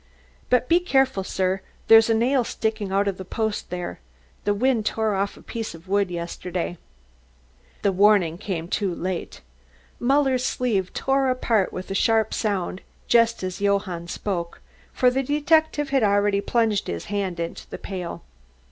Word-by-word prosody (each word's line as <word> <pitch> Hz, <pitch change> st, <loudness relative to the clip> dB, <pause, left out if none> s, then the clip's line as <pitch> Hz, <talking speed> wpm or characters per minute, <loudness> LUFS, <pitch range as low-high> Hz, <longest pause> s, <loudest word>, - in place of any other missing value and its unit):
But 250 Hz, 0 st, +3 dB
be 340 Hz, +1 st, +5 dB
careful, 265 Hz, -, +2 dB
sir; 190 Hz, 0 st, -1 dB, 0.3 s
there's 225 Hz, 0 st, +7 dB
a 225 Hz, -, +4 dB
nail 250 Hz, +3 st, +2 dB
sticking 220 Hz, -3 st, -2 dB
out 200 Hz, +1 st, +2 dB
of 195 Hz, -2 st, -1 dB
the 190 Hz, -, -6 dB
post 220 Hz, +3 st, -3 dB
there. 180 Hz, 0 st, -5 dB, 0.5 s
The 205 Hz, -, +3 dB
wind 240 Hz, 0 st, +2 dB
tore 220 Hz, 0 st, 0 dB
off 200 Hz, +1 st, -1 dB
a -, -, -15 dB
piece 225 Hz, -6 st, -5 dB
of 165 Hz, +3 st, -15 dB
wood 200 Hz, 0 st, +1 dB
yesterday." 175 Hz, 0 st, -4 dB, 1.0 s
The 200 Hz, -, +3 dB
warning 190 Hz, -4 st, +4 dB
came 175 Hz, -5 st, -4 dB
too 185 Hz, -1 st, -1 dB
late. 180 Hz, -, -4 dB, 0.6 s
Muller's 265 Hz, 0 st, +2 dB
sleeve 220 Hz, -8 st, 0 dB
tore 270 Hz, 0 st, +1 dB
apart 230 Hz, -6 st, +1 dB
with 185 Hz, +1 st, -7 dB
a -, -, 0 dB
sharp 220 Hz, +2 st, +2 dB
sound 195 Hz, -3 st, -2 dB, 0.3 s
just 230 Hz, -3 st, +3 dB
as 185 Hz, +1 st, -4 dB
Johann 195 Hz, -4 st, 0 dB
spoke, 170 Hz, -2 st, -4 dB, 0.3 s
for 250 Hz, -1 st, +3 dB
the 265 Hz, +2 st, 0 dB
detective 295 Hz, +1 st, +1 dB
had 270 Hz, -2 st, +3 dB
already 205 Hz, -1 st, +2 dB
plunged 225 Hz, -2 st, +1 dB
his 85 Hz, -1 st, -4 dB
hand 190 Hz, -4 st, -2 dB
into 170 Hz, 0 st, -5 dB
the -, -, -6 dB
pail. 180 Hz, -4 st, -6 dB
205 Hz, 160 wpm, -24 LUFS, 185-240 Hz, 1.0 s, there's